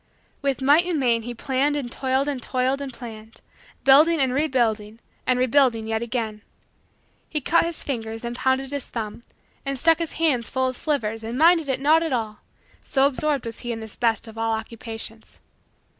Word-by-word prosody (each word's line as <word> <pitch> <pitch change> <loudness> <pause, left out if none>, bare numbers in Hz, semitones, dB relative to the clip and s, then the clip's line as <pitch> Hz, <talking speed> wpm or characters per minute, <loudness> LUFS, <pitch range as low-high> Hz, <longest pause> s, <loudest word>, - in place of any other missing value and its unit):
With 275 -2 -1
might 300 +6 +5
and 340 -4 0
main 235 -3 +2
he 240 +1 -6
planned 275 +4 0
and 265 -5 -3
toiled 265 +2 0
and 280 -3 -2
toiled 260 +2 0
and 275 -1 -5
planned; 225 -2 -10 0.4
building 300 +5 +6
and 260 -2 +2
rebuilding 235 -7 0 0.3
and 255 - +3
rebuilding 250 -3 +3
yet 220 0 -1
again. 225 -3 -3 0.9
He 305 - -1
cut 335 +4 +3
his 335 -1 -5
fingers 225 -4 -4
and 235 0 -4
pounded 265 +1 0
his 285 -2 -4
thumb 225 -1 -5 0.4
and 275 -1 -3
stuck 325 +4 +4
his 335 -2 -3
hands 285 -8 +1
full 260 -1 0
of 255 - -3
slivers 225 -7 -2
and 230 +3 -4
minded 325 -1 +5
it 260 -1 0
not 305 +4 +4
at 325 -4 -1
all 220 -3 -2 0.4
so 270 0 +2
absorbed 285 -1 0
was 230 0 -6
he 240 - -4
in 225 - -4
this 220 -1 -9
best 230 -1 0
of 225 0 -9
all 225 0 +1
Occupations. 225 0 -7
255 Hz, 190 wpm, -24 LUFS, 225-285 Hz, 0.9 s, building